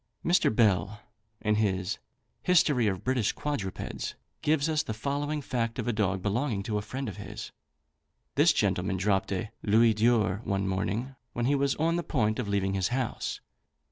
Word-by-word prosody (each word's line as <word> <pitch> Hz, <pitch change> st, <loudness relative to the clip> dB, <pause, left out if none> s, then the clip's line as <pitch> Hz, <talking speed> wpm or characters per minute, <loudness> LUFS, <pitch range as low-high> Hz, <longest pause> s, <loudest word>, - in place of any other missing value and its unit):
Mr. 175 Hz, +2 st, +4 dB
Bell, 105 Hz, -2 st, +2 dB, 0.4 s
in 105 Hz, -, +2 dB
his 95 Hz, -3 st, 0 dB, 0.4 s
"History 145 Hz, -9 st, +4 dB
of 95 Hz, -3 st, -1 dB
British 125 Hz, -4 st, +1 dB
Quadrupeds," 135 Hz, -11 st, -4 dB, 0.3 s
gives 150 Hz, 0 st, +2 dB
us 155 Hz, -2 st, +2 dB
the 110 Hz, -, -4 dB
following 145 Hz, +4 st, -2 dB
fact 115 Hz, -3 st, -2 dB
of -, -, -3 dB
a 120 Hz, -, +1 dB
dog 95 Hz, -3 st, 0 dB
belonging 105 Hz, 0 st, 0 dB
to 105 Hz, 0 st, -1 dB
a -, -, -4 dB
friend 130 Hz, +6 st, -5 dB
of 100 Hz, -, -6 dB
his. -, -, -7 dB, 0.8 s
This -, -, +5 dB
gentleman 95 Hz, -, +1 dB
dropped 95 Hz, +1 st, +1 dB
a 100 Hz, +3 st, -2 dB
louis 110 Hz, +2 st, +4 dB
d'or 110 Hz, -3 st, +2 dB
one 100 Hz, -1 st, -1 dB
morning, 100 Hz, +7 st, -1 dB, 0.2 s
when 120 Hz, -, -1 dB
he 140 Hz, -, +3 dB
was 140 Hz, -1 st, +2 dB
on 165 Hz, +2 st, +1 dB
the 175 Hz, -, -1 dB
point 110 Hz, -8 st, 0 dB
of 120 Hz, -, -2 dB
leaving 100 Hz, -1 st, 0 dB
his 95 Hz, -2 st, +1 dB
house. 125 Hz, -1 st, -2 dB
110 Hz, 175 wpm, -29 LUFS, 100-135 Hz, 0.8 s, This